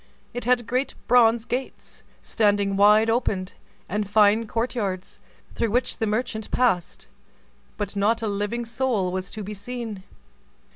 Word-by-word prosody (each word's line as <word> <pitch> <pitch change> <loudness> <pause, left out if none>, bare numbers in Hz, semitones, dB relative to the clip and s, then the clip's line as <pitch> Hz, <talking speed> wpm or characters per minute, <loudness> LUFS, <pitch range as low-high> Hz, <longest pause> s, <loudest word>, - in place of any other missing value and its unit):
It 245 - -5
had 245 -1 +2
great 255 +4 -1
bronze 235 -2 +4
gates, 255 +2 -5 0.2
standing 205 -2 +1
wide 210 +2 +5
open, 215 -5 0 0.4
and 205 -1 -2
fine 215 +2 +4
court 230 +3 -2
yards, 195 -6 -4 0.3
through 230 - -1
which 245 +4 0
the 225 - 0
merchant 220 0 -2
passed; 210 -9 0 0.7
but 205 -1 -4
not 220 +3 +1
a - - 0
living 205 +4 -2
soul 230 -5 -1
was 185 0 -4
to 215 - -6
be 210 +2 -6
seen. 220 -1 -6
220 Hz, 145 wpm, -24 LUFS, 205-240 Hz, 0.7 s, wide